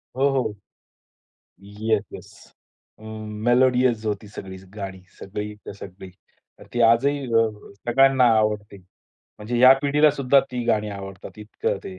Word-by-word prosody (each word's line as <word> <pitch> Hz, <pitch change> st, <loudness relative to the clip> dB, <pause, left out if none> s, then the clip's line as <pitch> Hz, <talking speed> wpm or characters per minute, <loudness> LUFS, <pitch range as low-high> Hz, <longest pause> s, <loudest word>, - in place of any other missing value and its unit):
हो, 135 Hz, +2 st, +2 dB
हो. 130 Hz, -6 st, -1 dB, 1.1 s
Yes, 105 Hz, +1 st, -2 dB
yes. -, -, -11 dB, 0.7 s
अ, -, -, -19 dB, 0.4 s
melodious 125 Hz, -2 st, +3 dB
होती 105 Hz, 0 st, -3 dB
सगळीच 95 Hz, -2 st, -10 dB
गाणी, 95 Hz, -3 st, -7 dB, 0.2 s
सगळीच्या 105 Hz, +1 st, -7 dB
सगळी. 95 Hz, -1 st, -11 dB, 0.6 s
ती 120 Hz, -, -1 dB
आजही 125 Hz, +6 st, +3 dB, 0.2 s
अ, 115 Hz, -, +4 dB, 0.4 s
सगळ्यांना 135 Hz, +1 st, +4 dB
आवडते. 105 Hz, -2 st, -1 dB, 0.6 s
म्हणजे 115 Hz, +3 st, -3 dB
या 130 Hz, +2 st, +9 dB
पिढीला 150 Hz, +1 st, +4 dB
सुद्धा 140 Hz, -1 st, +3 dB
ती 125 Hz, -1 st, -4 dB
गाणी 105 Hz, -2 st, +1 dB
आवडतात 95 Hz, 0 st, -9 dB
इतकं 105 Hz, 0 st, -3 dB
ते. 95 Hz, -1 st, -8 dB
110 Hz, 125 wpm, -23 LUFS, 100-130 Hz, 1.1 s, या